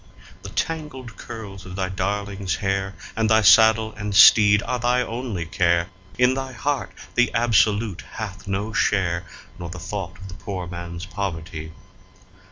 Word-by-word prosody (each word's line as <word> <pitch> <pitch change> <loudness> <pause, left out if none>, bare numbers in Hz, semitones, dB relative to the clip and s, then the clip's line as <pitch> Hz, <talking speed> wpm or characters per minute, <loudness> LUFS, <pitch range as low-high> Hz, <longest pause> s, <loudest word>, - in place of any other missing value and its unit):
The - - -8
tangled 150 -7 -4
curls 105 -5 -9
of 90 0 -9
thy 95 -1 -2
darling's 100 +1 -2
hair, 95 -1 -2 0.2
and 110 0 +1
thy 110 0 +4
saddle 110 +3 +6
and 105 -1 -4
teed 105 -1 +7
are 125 +1 -2
thy 125 +1 +2
only 115 -8 -4
care; 85 +1 +1 0.3
In 125 +1 +4
thy 135 0 -4
heart 130 -6 -2 0.2
the 125 0 +2
Absolute 110 -3 +2
hath 100 -3 -7
no 100 +3 -2
share, 90 -4 +1 0.3
nor 85 -1 -6
the 90 - -7
thought 95 0 -5
of 95 - -10
the 90 - -9
poor 95 -1 -5
man's 85 0 -7
poverty. 85 -5 -5
100 Hz, 155 wpm, -23 LUFS, 95-110 Hz, 0.3 s, teed